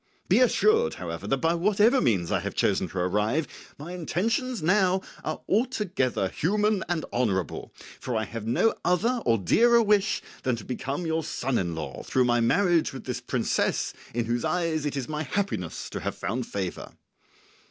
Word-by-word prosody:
Be 195 +6 +4
assured, 215 - +3
however, 85 +2 -6
that 135 - +1
by 165 +4 +1
whatever 210 +8 +3
means 90 -7 +1
I - - +2
have - - -5
chosen - - +1
to - - -8
arrive, 105 - +1 0.3
my 155 +5 -7
intentions 220 +6 -1
now 190 +1 +3 0.2
are - - -4
altogether 195 - 0
human 210 +3 +1
and 175 -3 -1
honourable; 100 -9 -1 0.3
for 125 - -3
I 110 - 0
have 110 +2 -6
no 220 - +3
other 230 +8 +1
or 115 -1 +4
dearer 235 - +4
wish 210 -1 +2 0.2
than 130 -2 0
to 115 - -9
become 135 +6 -3
your 160 0 0
son 135 -4 -1
in 85 -3 -2
law 80 - -5
through 130 -1 +1
my 120 0 +3
marriage 170 +8 +2
with - - -7
this - - -4
princess - - 0 0.2
in 120 0 -1
whose 120 +1 -1
eyes 165 -4 0
it 145 - -3
is 130 - -3
my 155 0 -3
happiness 155 - -3
to - - -4
have - - -3
found 120 +4 -3
favour." 95 -3 -5
155 Hz, 175 wpm, -26 LUFS, -, 0.3 s, Be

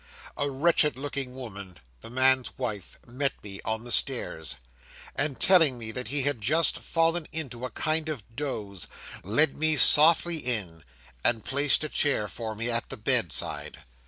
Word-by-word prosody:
'A 145 0 -1
wretched 150 -1 +1
looking 135 -2 -5
woman, 100 -8 -10 0.2
the - - -11
man's 130 +1 +1
wife, 110 -7 -5
met 135 +3 -2
me 100 -1 -9
on 110 0 -3
the 120 - -6
stairs, 90 - +1 0.6
and, 140 -5 -2
telling 160 -9 +4
me 110 -2 -6
that 125 +2 -5
he 140 -1 +2
had 145 -5 0
just 155 +9 +2
fallen 165 -1 0
into 130 -6 -5
a - - -5
kind 155 +2 0
of 140 -9 -4
doze, 105 -9 -5 0.4
led 135 +10 +1
me 155 0 +2
softly 165 +4 +7
in, 105 - -4 0.4
and 115 -3 +1
placed 140 +2 +2
a - - -2
chair 140 -9 +1
for 110 0 -6
me 115 +3 -4
at 115 -1 -2
the 135 - -7
bedside. 110 - -2
130 Hz, 160 wpm, -26 LUFS, 110-145 Hz, 0.6 s, softly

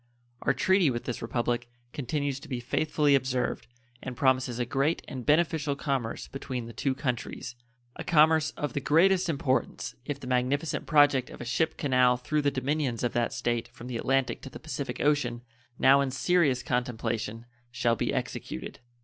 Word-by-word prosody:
Our - - +2
treaty 185 +5 +3
with 120 -2 -2
this 125 - -4
Republic 120 +1 -1 0.2
continues 140 0 -2
to - - -13
be 125 -3 -2
faithfully 145 +3 +1
observed, 130 -2 0 0.3
and 125 -2 -6
promises 130 -2 +2
a 120 - 0
great 140 +7 0
and 130 -2 -6
beneficial 155 -2 +2
commerce 135 -5 -2
between 130 -3 -5
the 115 - -9
two 135 +2 -1
countries 125 -1 -3 0.4
a - - -5
commerce 155 -2 +4
of 145 -4 -3
the - - 0
greatest 180 +6 +3
importance 140 -4 -1
if 140 0 -4
the 135 - -9
magnificent 130 +5 0
project 145 -4 +4
of - - -11
a 120 - -6
ship 160 +7 0
canal 125 -3 +3
through 150 +5 -1
the 145 - +2
dominions 135 -2 -1
of 120 - 0
that 120 -1 +1
State 120 -1 -1
from 120 - -12
the 125 -2 -4
Atlantic 135 +2 0
to - - -8
the - - -10
Pacific - - -5
Ocean, 125 -5 +1 0.3
now 135 +1 +6
in 140 - 0
serious 140 0 +2
contemplation, 115 -2 -2 0.3
shall 120 -1 +1
be - - -1
executed. - - -4
130 Hz, 175 wpm, -28 LUFS, 120-145 Hz, 0.4 s, now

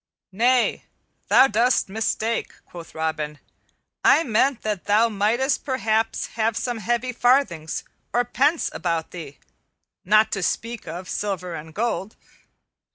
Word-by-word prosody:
"Nay, 245 +5 +2 0.4
thou - - +7
dost 245 +1 +2
mistake," 220 +2 -2
quoth 170 -2 -11
Robin, 155 -2 -2 0.7
"I 325 - +6
meant 255 +1 +1
that 210 -4 -3
thou 220 +3 +4
mightest 230 +6 +1
perhaps 225 -5 0
have 225 0 -1
some 240 0 -2
heavy 240 +3 -1
farthings 245 - +1 0.3
or 245 0 +1
pence 290 +7 +1
about 165 -1 -2
thee, 160 -6 -9 0.7
not 215 +3 +4
to 195 - -2
speak 230 +5 -2
of 180 +2 -6
silver 180 -4 -3
and 160 0 -8
gold. 215 +1 -2
220 Hz, 125 wpm, -23 LUFS, 180-240 Hz, 0.7 s, thou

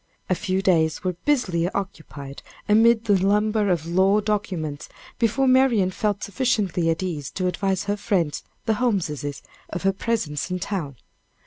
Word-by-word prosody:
A - - +6
few 190 0 -1
days 160 -2 +2
were 185 -1 0
busily 185 - +1
occupied 155 -8 -6 0.3
amid 225 +2 +4
the 200 -4 +3
lumber 210 +1 +2
of 170 -3 0
law 190 +4 +3
documents, 185 -8 -3 0.3
before 255 +4 +2
Marian 255 -7 +4
felt 205 +1 -1
sufficiently 200 -7 0
at 165 +3 0
ease 150 -7 -3
to 185 - -3
advise 190 +1 0
her 205 0 -1
friends, 180 -7 0 0.2
the 220 - +2
Holmeses, 160 - -1 0.3
of 175 - -5
her 195 0 +3
presence 190 -8 -2
in 180 - -1
town. 175 -7 -4
195 Hz, 150 wpm, -24 LUFS, 170-210 Hz, 0.3 s, A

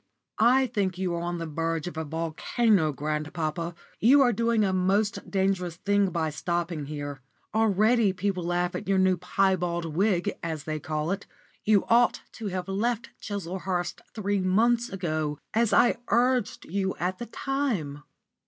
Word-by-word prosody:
"I 250 +4 +5
think 200 -7 -1
you 185 -2 -1
are 170 - -2
on 175 0 -2
the 165 - -4
verge 165 0 -2
of 180 - -6
a 160 - -2
volcano, 165 +4 +1
grandpapa. 155 +3 -3 0.2
You 270 +6 +6
are 245 -2 +3
doing 230 0 +2
a 190 -2 +1
most 195 +3 +1
dangerous 190 -3 0
thing 200 +2 +1
by 160 -3 -1
stopping 170 -1 -2
here. 145 -2 -5 0.3
Already 220 0 +3
people 190 -1 -2
laugh 175 +1 0
at - - -5
your 195 0 +2
new 190 0 +4
piebald 180 -3 0
wig, 190 -1 +2
as 160 -3 -4
they 155 0 -3
call 155 +2 -2
it. 200 +1 -3 0.4
You 210 -2 +4
ought 240 +1 +4
to 225 - -6
have 185 -1 -3
left 225 +4 -1
Chislehurst 185 -2 -3
three 205 -2 0
months 230 +6 +2
ago, 155 -5 -2 0.2
as 230 0 +2
I 240 +4 +4
urged 245 -1 +1
you 190 +2 -1
at 180 +2 -2
the 240 - -5
time." 225 - -2
185 Hz, 160 wpm, -27 LUFS, 165-215 Hz, 0.4 s, You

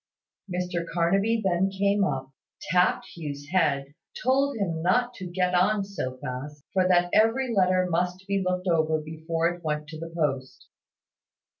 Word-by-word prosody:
Mr 180 -1 -2
Carnaby 195 +7 +2
then 190 +1 +2
came 200 +1 +1
up, 135 -7 -2 0.4
tapped 180 0 +3
Hugh's 145 -3 -6
head, 145 -6 +1 0.3
told 275 +1 +2
him 170 -6 -2
not 240 +8 +2
to 185 -5 -7
get 180 +1 0
on 200 +3 +3
so 160 -10 -5
fast, 140 +4 -6
for 185 -1 +3
that 175 -1 +3
every 230 +3 +3
letter 185 -2 +3
must 180 +2 -1
be 200 0 0
looked 185 0 -1
over 160 -2 +2
before 160 +2 -1
it 175 0 -7
went 150 -1 -2
to 155 -1 -8
the 165 +1 -6
post. 140 -6 -3
180 Hz, 155 wpm, -26 LUFS, 160-195 Hz, 0.4 s, tapped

